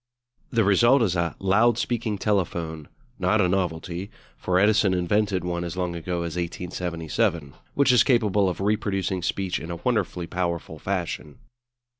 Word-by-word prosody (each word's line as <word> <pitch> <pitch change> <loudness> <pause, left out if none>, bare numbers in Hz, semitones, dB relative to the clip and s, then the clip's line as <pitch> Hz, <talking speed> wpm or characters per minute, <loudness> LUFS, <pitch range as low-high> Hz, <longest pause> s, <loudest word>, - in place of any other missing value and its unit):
The 115 -1 +2
result 120 +6 +5
is 95 -5 +1
a 85 -1 -1
"loud 110 +4 +3
speaking 115 -4 -1
telephone" 85 -7 -1 0.3
not 95 +4 +2
a 90 - +4
novelty, 90 0 -2 0.3
for 90 0 0
Edison 105 -1 +4
invented 95 +2 +1
one 85 -1 -2
as 85 +1 -5
long 90 -2 -2
ago 85 +1 -3
as 85 0 -4
1877 85 - -2 0.2
which 140 -2 +4
is 125 - +6
capable 105 -6 +3
of 90 - -5
reproducing 95 -2 -1
speech 95 +1 -1
in 80 - -8
a 85 - -3
wonderfully 95 -4 -1
powerful 85 -3 -3
fashion. 90 -5 -4
90 Hz, 150 wpm, -25 LUFS, 85-105 Hz, 0.3 s, is